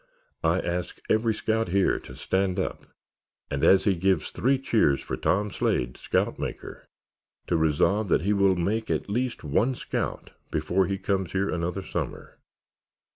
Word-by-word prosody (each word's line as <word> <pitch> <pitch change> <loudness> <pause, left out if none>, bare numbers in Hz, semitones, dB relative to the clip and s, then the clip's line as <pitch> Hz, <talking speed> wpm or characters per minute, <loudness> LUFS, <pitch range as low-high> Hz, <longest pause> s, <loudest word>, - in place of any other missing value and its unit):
I 80 +3 +3
ask 90 +1 -3
every 110 0 +2
scout 110 0 0
here 95 +1 +2
to 65 - -12
stand 95 +5 0
up 95 - -3 0.7
and 70 - -2
as 95 - +6
he 100 - +3
gives 95 +2 +1
three 135 +3 +2
cheers 110 - +2
for - - -4
Tom 100 +2 0
Slade, - - 0
scout - - -1
maker, - - -6 0.6
to - - 0
resolve 80 +7 +2
that 85 - +3
he 100 +3 +2
will 100 -2 +4
make 105 +6 -1
at - - -1
least 125 +3 -1
one 110 - +1
scout - - -4 0.2
before 90 +5 +1
he 100 - -1
comes 95 -2 -1
here 95 +1 0
another 90 +3 -2
summer. - - -5
95 Hz, 160 wpm, -26 LUFS, 85-105 Hz, 0.7 s, as